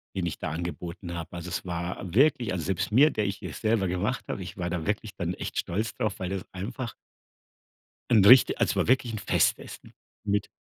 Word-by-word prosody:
den 90 -2 -1
ich - - -4
da 80 - -4
angeboten 85 +1 -5
habe. 85 +1 -6
Also, 85 +1 -6
es 90 - -4
war 85 +1 -4
wirklich 125 -5 +3
also, 85 -4 -3
selbst 100 +2 -1
mir, 140 +7 +6
der 105 -7 -1
ich 100 0 -2
hier - - -7
selber 110 -3 +1
gemacht 100 +9 -1
habe, 95 - -3
ich 90 - -9
war 85 -1 -2
da 85 -3 -3
wirklich 105 0 -2
dann 85 0 -2
echt - - -6
stolz 110 +6 -2
drauf, 110 -2 -2
weil 95 -1 -3
das 95 -1 -4
einfach 110 +5 -5 1.2
'n 105 -5 +5
richti 125 +3 +8
also - - +1
war - - +1
wirklich 125 -2 +2
Festessen - - 0 0.3
mit 100 0 0
95 Hz, 205 wpm, -27 LUFS, 85-110 Hz, 1.2 s, richti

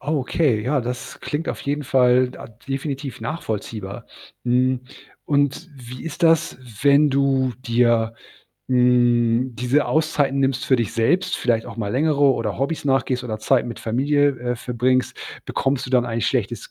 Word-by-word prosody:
Okay, 140 -4 0
ja, 135 +5 0
das 125 +1 -6
klingt 150 +3 -4
auf - - -4
jeden 145 +1 -2
Fall 125 -1 +3
da 125 - -10 0.2
definitiv 135 0 -4
nachvollziehbar. 110 - -5 0.4
Hm, 125 +1 +2 0.4
und 145 +4 0
wie 125 -1 -10
ist 165 +2 -7
das, 165 0 +3 0.2
wenn 145 +1 +5
du 135 -2 +1
dir, 115 -2 +2 0.6
hm, 125 -1 +3
diese 125 +5 +1
Auszeiten 145 -3 +1
nimmst 135 -2 0
für 130 - +4
dich 115 -5 -2
selbst, 175 +12 +1
vielleicht 115 -2 0
auch - - -9
mal 105 -3 -3
längere 150 +2 +1
oder 115 -7 +2
Hobbys 140 +4 -2
nachgehst 130 -2 0
oder 110 -3 -4
Zeit 120 +4 +2
mit 120 - -6
Familie, 145 +5 +1
äh, 120 0 -2
verbringst, 125 +2 0 0.3
bekommst 135 0 -1
du 125 - -8
dann 125 -2 +3
ein 115 -1 -2
schlechtes - - -2
130 Hz, 155 wpm, -22 LUFS, 120-140 Hz, 0.6 s, wenn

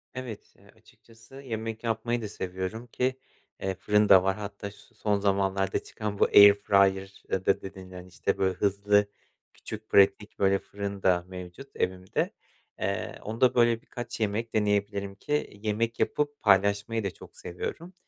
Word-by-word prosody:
Evet, 125 -4 -8
eee, - - -20
açıkçası 115 +4 -16
yemek 115 -3 -5
yapmayı 120 +1 -1
da 110 - -4
seviyorum 95 +4 -5
ki, 130 +3 -1 0.4
eee, 95 0 -2
fırın 105 +3 +2
da 95 -2 +8
var. 95 0 +1
Hatta, 100 0 -6
şu 115 +3 -19
son 105 -1 0
zamanlarda 95 -1 +1
çıkan 105 -2 -5
bu - - +6
air 100 0 +9
fryer'da 95 -1 +1
dedin, 95 -1 -10
hani, 90 0 -10
işte, 90 - -2
böyle, 95 -1 +1
hızlı, 100 +2 +2 0.5
küçük, 110 0 -8
pratik, 100 +1 +3
böyle, 95 0 +3
fırın 100 -1 -6
da 90 -2 +3
mevcut 90 +8 -9
evimde. 95 0 -1 0.5
Eee, - - -3
onda, 115 +4 +1
böyle, 120 -1 +3
birkaç 120 -1 -7
yemek 110 +2 -1
deneyebilirim 100 -2 0
ki 145 -2 -3
yemek 115 +2 -1
yapıp 145 -1 0
paylaşmayı 100 +2 +2
da 100 - -2
çok 85 - -15
seviyorum 170 - -6
100 Hz, 150 wpm, -28 LUFS, 95-115 Hz, 0.5 s, air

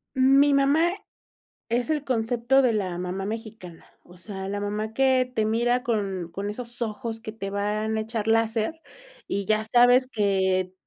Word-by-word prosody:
Mi 275 +2 +5
mamá 285 +5 +3 0.8
es 240 +6 -1
el 300 -2 0
concepto 245 +2 +2
de 250 - +3
la 190 -5 -2
mamá 180 +2 -4
mexicana. 215 -6 -8 0.2
O 180 - -17
sea, 190 +1 -7
la 205 +1 -3
mamá 210 +2 -3
que 260 0 +3
te 220 - +1
mira 240 +3 +1
con 195 -7 -2
con 200 +4 -4
esos 240 +2 -6
ojos 225 0 -4
que 220 -1 -7
te 195 -3 -6
van 210 +2 -1
a - - 0
echar 225 -1 -4
láser 225 +6 +1 0.5
y 200 0 -2
ya 215 +2 +1
sabes 245 +3 +5
que 190 -5 0
220 Hz, 165 wpm, -25 LUFS, 200-245 Hz, 0.8 s, Mi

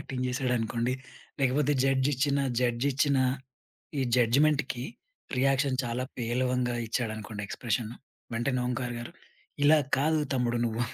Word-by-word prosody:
acting 130 -1 -4
జేసాడనుకోండి, 125 -2 0 0.5
లేకపోతే 135 +2 +2
judge 135 0 +3
ఇచ్చిన 140 +2 +1 0.2
judge 120 +1 +1
ఇచ్చిన 140 +1 +2 0.8
ఈ - - +1 0.2
జడ్జిమెంట్‌కి 130 +1 +2 0.5
రియాక్షన్ 135 0 +2
చాలా 120 +1 -2
పేలవంగా 125 +1 0
ఇచ్చాడనుకోండి 110 -3 -3
ఎక్స్ప్రెషన్ 115 0 -2 0.4
వెంటనే 125 +2 0
ఓంకార్ 125 0 -2
గారు 120 - -7 0.5
"ఇలా 155 +2 +7 0.2
కాదు 155 +2 +2
తమ్ముడు 120 -2 +1
నువ్వు, 115 +1 -1
125 Hz, 115 wpm, -29 LUFS, 120-135 Hz, 0.8 s, ఇలా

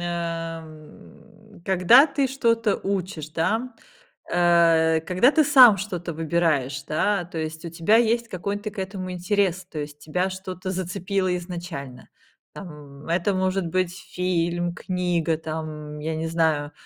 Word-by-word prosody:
м, 165 +4 -7
когда 190 - +6
ты 280 -1 0
что-то 230 -5 +1
учишь, 185 -5 -4
да. 220 +11 -1 0.6
Э, 165 -2 +4
когда 185 - +3
ты 315 - +4
сам 255 -8 +8
что-то 180 -3 -4
выбираешь, 155 -4 0
да. 175 +4 0
То 165 -1 -7
есть 160 +1 -5
у 170 - -5
тебя 165 +7 +3
есть 235 0 +2
какой-то 205 +3 -4
к 205 - -16
этому 190 -1 -4
интерес, 185 0 0
то 160 -4 -8
есть 145 0 -6
тебя 180 +5 -2
что-то 185 0 -6
зацепило 185 +1 -2
изначально. 170 -8 -7 0.4
Там, 150 -5 -11
это 175 +4 +1
может 185 -1 0
быть 185 +1 -1
фильм, 175 -2 -2
книга, 175 -4 -1
там, 155 -1 -6
я 160 +2 -3
не 160 - -3
знаю. 160 -3 0
175 Hz, 135 wpm, -24 LUFS, 160-195 Hz, 0.6 s, сам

